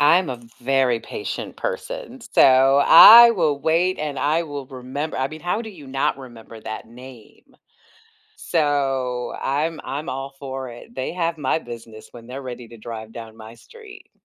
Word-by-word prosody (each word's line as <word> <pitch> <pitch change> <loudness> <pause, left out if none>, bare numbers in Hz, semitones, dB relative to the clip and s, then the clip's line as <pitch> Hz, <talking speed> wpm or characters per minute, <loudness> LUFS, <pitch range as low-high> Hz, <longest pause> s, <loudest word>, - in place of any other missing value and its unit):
I'm 170 +5 +4
a 125 -2 -6 0.2
very 130 -2 +1
patient 415 - -6
person, - - -6
so 135 - +4
I 235 +7 +10
will 160 -10 0
wait 165 +5 +1
and 150 -2 -4
I 155 +4 0
will 145 -3 -7
remember 130 +4 -6
I 130 +1 -1
mean, 155 +2 -10
how 175 +7 -2
do 220 - -8
you 155 -9 -14
not 135 0 -1
remember 115 -3 -12
that 110 +1 -7
name? 125 -1 -15 0.8
So 135 - -1
I'm 150 +4 -1
I'm 150 +5 -5
all 135 +1 -6
for 135 -1 -6
it. 120 0 -13
They 130 +4 -4
have 170 -2 -2
my 135 +1 0
business 115 -4 -11
when 115 -1 -13
they're 130 +2 -7
ready 125 -2 -8
to 115 - -13
drive 110 0 -9
down 115 -2 -10
my 110 +1 -12
street. 440 - -15
135 Hz, 170 wpm, -21 LUFS, 125-160 Hz, 0.8 s, I